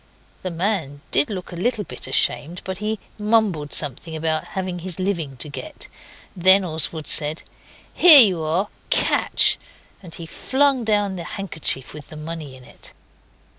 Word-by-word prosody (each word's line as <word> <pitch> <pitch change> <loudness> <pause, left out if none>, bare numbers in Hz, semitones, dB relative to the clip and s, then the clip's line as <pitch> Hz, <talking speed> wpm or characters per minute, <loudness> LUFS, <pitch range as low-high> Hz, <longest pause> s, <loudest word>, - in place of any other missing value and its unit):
The 185 - -4
man 170 -5 -3
did 140 - +2
look 190 -4 -6
a - - -8
little 220 +4 -1
bit 125 - -7
ashamed, 145 +9 0
but 190 0 -6
he 215 +1 -3 0.2
mumbled 210 -9 0
something 150 +3 -2
about 160 0 -1
having 185 -2 -3
his 180 0 -4
living 170 -8 -3
to 135 - -4
get. 295 - -8 0.5
Then 190 +2 +4
Oswald 160 -1 -2
said 150 +1 +1 0.5
'Here 315 -6 +10
you 190 -7 +5
are. 170 +7 -1 0.2
Catch!' - - +2 0.4
and 175 -4 -10
he 170 - -8
flung 265 - 0
down 205 -3 0
the 170 - -6
handkerchief 160 -9 -3
with 150 -1 -11
the 155 - -10
money 155 -3 -8
in 130 - -16
it. - - -11
175 Hz, 160 wpm, -21 LUFS, 155-200 Hz, 0.5 s, Here